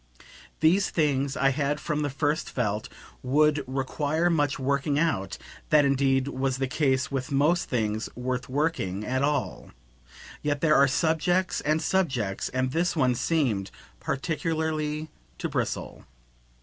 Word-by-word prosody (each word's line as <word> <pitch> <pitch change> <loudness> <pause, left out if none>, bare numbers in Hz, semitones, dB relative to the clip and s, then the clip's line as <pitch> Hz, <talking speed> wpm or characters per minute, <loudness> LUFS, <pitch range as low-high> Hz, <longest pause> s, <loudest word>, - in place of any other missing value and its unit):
These 180 +5 +4
things, 140 -3 0
I 135 - +3
had 145 +2 -1
from 150 -1 -2
the 145 - 0
first 145 +3 -1
felt, 105 -4 -2 0.3
would 150 +3 +2
require 145 +5 0
much 145 -4 +1
working 140 +2 0
out; 110 - 0 0.3
that 150 -2 +5
indeed 135 -1 +2
was 135 -1 -1
the 135 - 0
case 135 +1 +1
with 135 -1 -3
most 150 +5 +2
things 110 -3 -1
worth 125 0 -3
working 130 - -1
at 130 +2 -1
all; 145 +1 -1 0.7
yet 145 -1 -1
there 160 -2 +4
are 140 - +6
subjects 165 +5 +1
and 155 +2 +1
subjects, 130 - 0
and 130 0 -1
this 170 +4 0
one 130 -5 +3
seemed 120 - 0 0.3
particularly 155 +1 -2 0.3
to - - -2
bristle. - - -3
140 Hz, 135 wpm, -27 LUFS, 130-155 Hz, 0.7 s, are